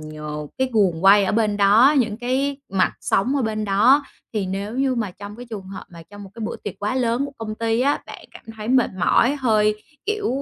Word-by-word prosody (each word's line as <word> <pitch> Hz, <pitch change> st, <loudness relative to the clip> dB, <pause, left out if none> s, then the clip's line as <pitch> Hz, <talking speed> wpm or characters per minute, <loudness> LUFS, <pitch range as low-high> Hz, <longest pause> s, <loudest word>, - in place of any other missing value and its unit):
nh 150 Hz, -1 st, -7 dB
cái 260 Hz, 0 st, +1 dB
guồng 190 Hz, -5 st, +1 dB
quay 200 Hz, +1 st, +7 dB
ở -, -, -1 dB
bên 210 Hz, -2 st, +1 dB
đó, 215 Hz, +8 st, +5 dB
những 220 Hz, -4 st, 0 dB
cái 265 Hz, +3 st, -1 dB, 0.2 s
mặt 190 Hz, -1 st, +2 dB
sống 255 Hz, +8 st, +1 dB
ở 270 Hz, -, 0 dB
bên 215 Hz, -1 st, -2 dB
đó 230 Hz, +9 st, +4 dB, 0.3 s
thì 205 Hz, -4 st, -2 dB
nếu 200 Hz, +4 st, -4 dB
như 270 Hz, -1 st, +1 dB
mà 220 Hz, -5 st, -2 dB
trong 205 Hz, +3 st, -10 dB
cái 245 Hz, 0 st, -10 dB
trường 210 Hz, -4 st, -6 dB
hợp 195 Hz, -, -8 dB
mà 170 Hz, -1 st, -12 dB
trong 205 Hz, 0 st, -11 dB
một 190 Hz, -, -13 dB
cái 230 Hz, -, -10 dB
bữa -, -, -4 dB
tiệc 205 Hz, -, -7 dB
quá 210 Hz, +5 st, -2 dB
lớn 245 Hz, +1 st, 0 dB
của 285 Hz, -, -7 dB
công 215 Hz, -1 st, -5 dB
ty 230 Hz, +1 st, -1 dB
á, 280 Hz, +2 st, +2 dB
bạn -, -, -11 dB
cảm -, -, -15 dB
thấy 215 Hz, +1 st, -7 dB
mệt 255 Hz, -1 st, +3 dB
mỏi, 250 Hz, +9 st, +3 dB
hơi, 215 Hz, -4 st, +1 dB, 0.2 s
kiểu, 425 Hz, -1 st, -1 dB
215 Hz, 235 wpm, -22 LUFS, 200-250 Hz, 0.3 s, quay